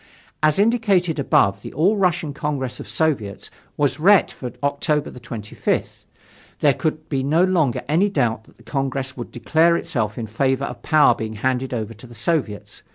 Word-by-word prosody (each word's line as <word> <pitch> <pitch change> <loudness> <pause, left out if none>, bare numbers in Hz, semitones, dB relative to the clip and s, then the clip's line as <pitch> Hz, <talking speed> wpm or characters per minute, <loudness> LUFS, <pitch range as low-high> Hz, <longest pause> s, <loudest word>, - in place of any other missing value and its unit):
As 155 -1 +3
indicated 200 -7 +2
above, 100 -7 +2
the - - -8
All 180 +9 +3
Russian 175 -6 0
Congress 140 -4 -3
of 100 - -8
Soviets 110 -6 -1 0.3
was 145 -1 +1
ret 195 +5 +5
for 125 -2 -7
October 145 +1 0
25th. 115 -3 -4 0.5
There 145 -2 +4
could 155 +1 -3
be 135 -3 -1
no 155 +6 +2
longer 165 -11 +1
any 170 +8 +2
doubt 115 - 0
that - - -23
the 115 - -19
Congress 135 +1 -2
would 120 - -7
declare 165 +7 +2
itself 110 -9 -2
in 115 - -3
favor 130 +5 0
of - - -7
power 150 -5 +5
being 110 -1 -5
handed 130 +4 -1
over 115 -2 -3
to 115 +3 -14
the 120 - -13
Soviets. 115 - -2
140 Hz, 170 wpm, -21 LUFS, 120-160 Hz, 0.5 s, ret